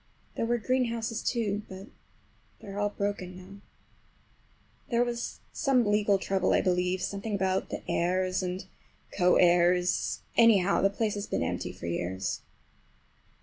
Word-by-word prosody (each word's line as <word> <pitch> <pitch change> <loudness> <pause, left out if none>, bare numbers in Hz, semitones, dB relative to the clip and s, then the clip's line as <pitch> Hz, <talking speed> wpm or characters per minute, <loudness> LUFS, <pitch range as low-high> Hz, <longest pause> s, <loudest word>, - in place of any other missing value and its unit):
There 230 - -1
were 240 +1 +2
greenhouses, 230 -2 -1
too, 215 -4 -1
but 190 +1 -8 0.7
they - - -11
are 200 +1 -5
all 205 0 +1
broken 200 -3 -4
now. 195 +2 -12 1.3
There 235 0 +3
was 240 -1 -4
some 265 -5 +2
legal 205 -1 +3
trouble, 190 -1 0
I - - +4
believe, 180 0 0
something 200 +1 -3
about 190 -1 0
the - - -6
heirs 185 +2 0
and 185 0 -4 0.5
co 180 -2 +4
heirs; 175 0 +3
anyhow, 200 -5 +5
the 195 - +4
place 210 +1 -1
has 205 0 -4
been - - -1
empty - - -3
for - - -10
years. 90 +3 -3
195 Hz, 145 wpm, -29 LUFS, 180-220 Hz, 1.3 s, anyhow